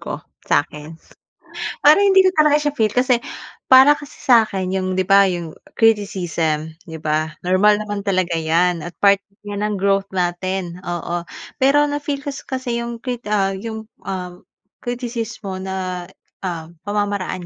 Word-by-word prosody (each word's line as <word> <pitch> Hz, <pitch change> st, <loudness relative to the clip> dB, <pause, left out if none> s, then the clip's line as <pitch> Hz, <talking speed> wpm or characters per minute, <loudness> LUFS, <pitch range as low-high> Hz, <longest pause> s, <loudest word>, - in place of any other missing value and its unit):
ko, -, -, -5 dB, 0.3 s
sa'kin. 150 Hz, +2 st, -1 dB, 0.9 s
Parang 310 Hz, +7 st, +7 dB
hindi 385 Hz, 0 st, +6 dB
ko 375 Hz, -, +6 dB
talaga 300 Hz, -1 st, +5 dB
siya 295 Hz, -1 st, -1 dB
feel 220 Hz, -5 st, +2 dB
kasi 250 Hz, -1 st, +2 dB, 0.5 s
para 265 Hz, +3 st, +9 dB
kasi 290 Hz, -1 st, -12 dB
sa 235 Hz, -3 st, +5 dB
'kin 190 Hz, -1 st, -3 dB
yung 185 Hz, -1 st, -1 dB
'di 185 Hz, -, +1 dB
ba 200 Hz, 0 st, +7 dB
yung 170 Hz, -3 st, -5 dB, 0.3 s
criticism 170 Hz, -8 st, +1 dB, 0.2 s
'di 160 Hz, -, -6 dB
ba, 155 Hz, 0 st, -1 dB
normal 205 Hz, +3 st, +4 dB
naman 205 Hz, -1 st, -4 dB
talaga 185 Hz, -3 st, 0 dB
'yan 165 Hz, +1 st, +1 dB
at 175 Hz, -, -6 dB
part 200 Hz, -1 st, +5 dB, 0.3 s
'yan 205 Hz, 0 st, -4 dB
ng 210 Hz, -1 st, -1 dB
growth 195 Hz, 0 st, +1 dB
natin, 180 Hz, 0 st, -2 dB
oo. 175 Hz, 0 st, -3 dB, 0.4 s
Pero 290 Hz, +2 st, +5 dB
na-feel 290 Hz, -1 st, -3 dB
kas 280 Hz, -2 st, -5 dB
kasi 255 Hz, -3 st, -3 dB
yung 235 Hz, 0 st, -5 dB
krit 245 Hz, -1 st, -5 dB
ah, 195 Hz, -2 st, +2 dB
yung, 220 Hz, +2 st, -6 dB, 0.2 s
um, 180 Hz, -2 st, -6 dB, 0.4 s
kritisismo 235 Hz, -5 st, -4 dB
na, 185 Hz, -2 st, -4 dB, 0.4 s
ah, 170 Hz, -4 st, -4 dB, 0.2 s
pamamaraan 205 Hz, -3 st, -2 dB
195 Hz, 150 wpm, -20 LUFS, 180-235 Hz, 0.9 s, para